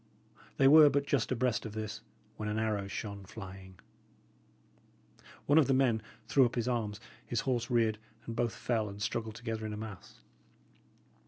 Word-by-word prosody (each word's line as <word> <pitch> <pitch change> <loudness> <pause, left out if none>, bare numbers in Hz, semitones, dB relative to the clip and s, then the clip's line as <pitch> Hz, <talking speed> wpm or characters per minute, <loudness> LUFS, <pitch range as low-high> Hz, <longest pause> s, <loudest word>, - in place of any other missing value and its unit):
They 135 - +5
were 150 +1 +9
but 140 0 +1
just 135 -4 0
abreast 125 -3 +1
of 110 - -6
this, 110 -1 -5 0.3
when 105 0 -4
an 105 - -1
arrow 105 -3 -1
shone 100 0 -5
flying. 95 -1 -10 1.7
One 145 +3 +5
of 150 - +4
the 135 - +3
men 125 -5 +3 0.3
threw 135 - +5
up 120 - +1
his 120 -1 -1
arms, 110 -4 -1 0.2
his 120 - -2
horse 120 -4 -1
reared, 115 -3 +2 0.3
and 115 - -5
both 120 -2 0
fell 110 -4 -1
and 100 0 -9
struggled 110 0 -3
together 115 -2 -4
in 110 -1 -4
a - - -5
mass. 110 -3 -9
110 Hz, 170 wpm, -32 LUFS, 105-125 Hz, 1.7 s, were